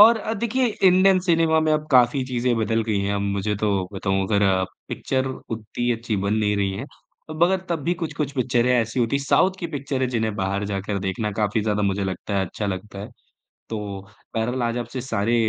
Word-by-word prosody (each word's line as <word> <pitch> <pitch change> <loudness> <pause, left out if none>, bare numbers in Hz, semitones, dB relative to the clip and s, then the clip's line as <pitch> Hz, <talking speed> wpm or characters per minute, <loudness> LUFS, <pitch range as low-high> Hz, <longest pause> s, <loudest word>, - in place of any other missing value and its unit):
और 225 +2 +9
अ, 220 - -3
देखिए 235 +4 +1
Indian 190 -2 +4
cinema 165 -3 +3
में 155 0 +2
अब 155 0 0
काफ़ी 125 +1 +4
चीज़ें 125 -1 0
बदल 115 +1 +1
गई 105 -3 0
हैं। 100 +1 0
अब 100 - -1
मुझे 100 +1 -1
तो 100 -3 0
बताऊँ 95 0 0
अगर 105 -1 +2
अ, 95 -1 +3 0.2
पिक्चर 130 0 -1
उतनी 120 -1 -4
अच्छी 115 -2 -2
बन 100 +2 0
नहीं 105 -1 +1
रही 100 -1 +1
हैं। 135 - -5 0.4
अब 155 +2 -3
अगर 190 +1 +2
तब 165 -4 -1
भी 175 - +1
कुछ-कुछ 155 -4 -3
पिक्चरें 125 -1 +2
ऐसी 115 +1 +1
होती 120 +3 +1
हैं 140 - -3
साउथ 185 - +4
की 170 - -3
पिक्चरें 135 -3 -2
जिन्हें 110 -3 -1
बाहर 100 0 -1
जाकर 100 0 -2
देखना 95 +3 -2
काफ़ी 105 +1 0
ज़्यादा 105 -1 0
मुझे 100 0 0
लगता 95 +2 -2
है 95 - +1
अच्छा 105 - -4
लगता 100 +1 -5
है। 105 - -6 0.6
तो 110 - -3 0.6
बहरहाल 120 +3 -1
आज 115 0 0
आपसे 120 +2 -4
सारे 115 -2 0
115 Hz, 210 wpm, -23 LUFS, 100-140 Hz, 0.6 s, और